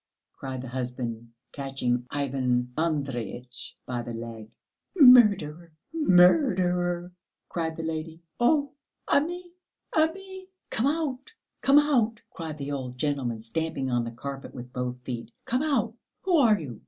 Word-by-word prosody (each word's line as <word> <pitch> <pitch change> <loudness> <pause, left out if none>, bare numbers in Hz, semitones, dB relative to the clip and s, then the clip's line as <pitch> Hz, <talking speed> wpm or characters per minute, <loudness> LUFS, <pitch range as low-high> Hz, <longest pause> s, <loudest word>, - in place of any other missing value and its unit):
cried 130 -2 -6
the - - -6
husband, 120 -2 -4 0.2
catching 125 -3 -2
Ivan 125 -3 -1
Andreyitch 135 -5 -3
by 125 -1 -3
the 120 0 -6
leg. 115 -1 -7 0.5
"Murderer, 200 - +6 0.2
murderer!" 180 - +3 0.4
cried 160 -2 -2
the 165 - -4
lady. 160 +1 -4 0.2
"Oh, 285 +2 +3 0.3
Ami! 350 +4 0 0.4
Ami!" 375 +4 -1 0.2
"Come 230 +5 +1
out, 295 - -2 0.3
come 275 +1 +5
out!" 245 -7 +3
cried 160 -3 -6
the 140 0 -4
old 130 -3 -4
gentleman, 125 -6 -1
stamping 135 +1 -2
on 120 -1 +1
the 115 - -4
carpet 135 +3 -7
with 125 0 -9
both 125 0 -3
feet; 120 -2 -5
"come 250 +3 0
out. 255 -8 +1 0.3
Who 370 -2 +2
are 225 -8 +5
you? 125 -8 -7
155 Hz, 130 wpm, -27 LUFS, -, 0.5 s, Murderer